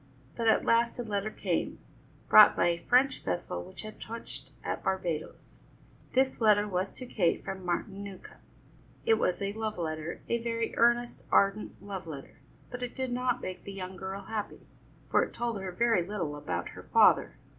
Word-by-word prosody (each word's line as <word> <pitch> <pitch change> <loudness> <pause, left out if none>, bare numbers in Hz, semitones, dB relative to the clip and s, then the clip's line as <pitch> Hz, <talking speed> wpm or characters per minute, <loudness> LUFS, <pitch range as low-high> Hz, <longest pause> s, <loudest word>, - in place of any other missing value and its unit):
But 230 - -1
at 220 - +4
last 235 0 +3
a 245 - -2
letter 210 -1 -2
came, - - -2 0.5
brought 215 -1 +9
by - - +3
a 170 0 0
French 260 +2 +3
vessel 90 -1 -2
which - - -10
had 215 0 -9
touched 230 +1 -7
at - - -3
Barbadoes. 175 -5 -3 0.5
This 260 -1 +2
letter 210 -1 +5
was 190 -1 -1
to 255 - -7
Kate 185 -8 0
from 190 -1 -5
Martin 190 +3 -2
Newcombe. 195 -2 -10 0.6
It 450 -1 +4
was 180 +2 0
a 200 0 -1
love 220 -1 -3
letter, 155 -1 -4
a 235 - +1
very 230 -1 -2
earnest, 240 +1 +2
ardent 200 +2 +2
love 195 -4 -6
letter, 140 -4 -9 0.3
but 245 - -6
it 245 -1 -4
did 260 -1 -2
not 250 0 0
make 185 - -5
the 200 - -7
young 185 -1 -6
girl 190 +2 -5
happy, 210 +1 -5 0.5
for - - +5
it - - -3
told 235 -4 -2
her 190 -1 -4
very 225 +1 +3
little 170 -6 -3
about 90 -12 -3
her - - -10
father. - - +5
200 Hz, 180 wpm, -30 LUFS, 185-235 Hz, 0.6 s, brought